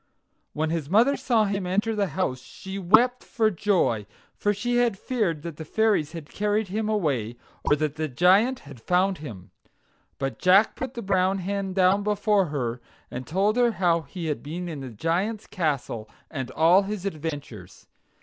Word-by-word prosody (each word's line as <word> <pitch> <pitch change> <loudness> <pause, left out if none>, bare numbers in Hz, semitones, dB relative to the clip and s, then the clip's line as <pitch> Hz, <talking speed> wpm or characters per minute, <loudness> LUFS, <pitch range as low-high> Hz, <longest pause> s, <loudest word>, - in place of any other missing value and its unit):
When 155 +1 -1
his 160 -4 -2
mother 235 +9 +4
saw 230 -6 +2
him 195 -2 -2
enter 205 +5 0
the 205 -2 +1
house 130 -9 -1
she 190 +8 -8
wept 230 +7 +4
for 220 -2 +1
joy, 170 - +1 0.3
for 205 - +1
she 240 +4 -1
had 240 -4 +2
feared 190 - -1
that 170 -3 -6
the 160 - -6
fairies 200 -3 +1
had 165 -3 -7
carried 210 0 0
him 215 +2 -2
away, 135 - -1 0.3
or - - +4
that 150 0 -2
the 155 0 -1
Giant 190 - +3
had 140 -5 -13
found 185 +6 +1
him. 105 - -9 0.7
But 135 0 -3
Jack 195 +4 +5
put 265 0 -5
the 235 - -5
brown 190 0 +2
hen 195 0 -3
down 190 +1 +3
before 205 -1 +2
her, 125 -5 -3 0.3
and 125 +1 -6
told 195 +7 +1
her 240 -2 +3
how 170 -4 +2
he 170 +2 -7
had 150 -2 -2
been 170 +5 -5
in 160 -4 -5
the 135 -1 -6
Giant's 175 - -1
castle, 140 - -2 0.2
and 130 -5 -4
all 165 +8 +5
his 200 -1 -5
adventures. 145 - -6
185 Hz, 180 wpm, -25 LUFS, 150-210 Hz, 0.7 s, Jack